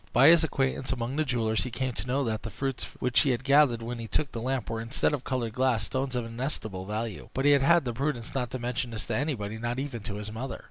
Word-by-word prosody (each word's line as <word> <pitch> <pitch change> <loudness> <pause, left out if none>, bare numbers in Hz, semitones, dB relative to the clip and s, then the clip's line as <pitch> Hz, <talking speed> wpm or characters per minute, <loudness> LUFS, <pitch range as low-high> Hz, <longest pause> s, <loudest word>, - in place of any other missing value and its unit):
By 135 +5 +8
his 170 -1 +7
acquaintance 135 -3 0
among 120 0 -2
the 155 - +2
jewellers 115 -5 0
he 125 - -3
came 130 +1 -2
to 120 - -4
know 135 +3 +1
that 110 -3 -1
the 115 - -5
fruits 135 +2 -3
which 125 0 +2
he 145 - +4
had 125 0 0
gathered 140 -4 +4
when 120 +1 -4
he 115 - -5
took 145 +4 0
the 115 - -5
lamp 130 -1 -1
were, 115 0 -3
instead 115 +6 0
of 140 -3 -2
colored 120 -4 -2
glass, 125 -4 +2
stones 130 +3 -2
of 120 -2 -1
inestimable 115 -6 -4
value; 110 0 -4
but 135 - 0
he 145 - +7
had 145 +3 +5
the 120 - -2
prudence 130 -2 -2
not 125 -3 -1
to - - -4
mention 125 +1 -2
this 115 -2 -4
to 115 - -2
anyone, 110 -6 -2
not 120 +1 -2
even 135 -4 -4
to 100 0 -5
his 105 0 -5
mother. 125 +4 -4
125 Hz, 265 wpm, -28 LUFS, 115-135 Hz, -, By